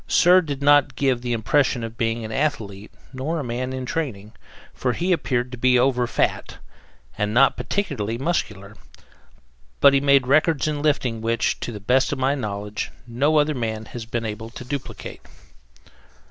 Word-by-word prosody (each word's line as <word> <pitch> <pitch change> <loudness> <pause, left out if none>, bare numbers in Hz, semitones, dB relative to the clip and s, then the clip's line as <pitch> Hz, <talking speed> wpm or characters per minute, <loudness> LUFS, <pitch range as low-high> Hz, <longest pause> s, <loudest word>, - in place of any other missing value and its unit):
Cyr 180 +1 +5
did 140 -4 -5
not 145 -1 +4
give 130 -3 +1
the 120 0 -3
impression 120 +2 +1
of 115 0 -6
being 115 0 -1
an 110 - -7
athlete, 110 -7 -2 0.2
nor 135 +6 -3
of - - -2
a 130 - -6
man 125 +2 -3
in 130 -1 -4
training, 120 -9 -4 0.4
for 125 -1 -1
he 180 +7 -1
appeared 125 -7 0
to 125 - -8
be 125 0 +4
over 125 -1 +2
fat - - -1 0.6
and 105 +1 -1
not 135 +2 +5
particularly 115 - -2
muscular; 105 - -3 1.0
but 140 - +7
he 135 - +3
made 140 -2 +4
records 155 +2 +2
in 150 -1 -2
lifting 130 -7 0
which, 115 +1 0
to - - -4
the 105 - -7
best 125 +6 +2
of 145 - -2
my 130 +1 +1
knowledge, 105 -5 -4 0.2
no 140 +6 +1
other 150 +1 +3
man 110 -4 -3
has 115 0 -8
been 115 0 -3
able 110 +1 -5
to 125 +1 -10
duplicate. 135 +1 -6
125 Hz, 175 wpm, -23 LUFS, 115-145 Hz, 1.0 s, but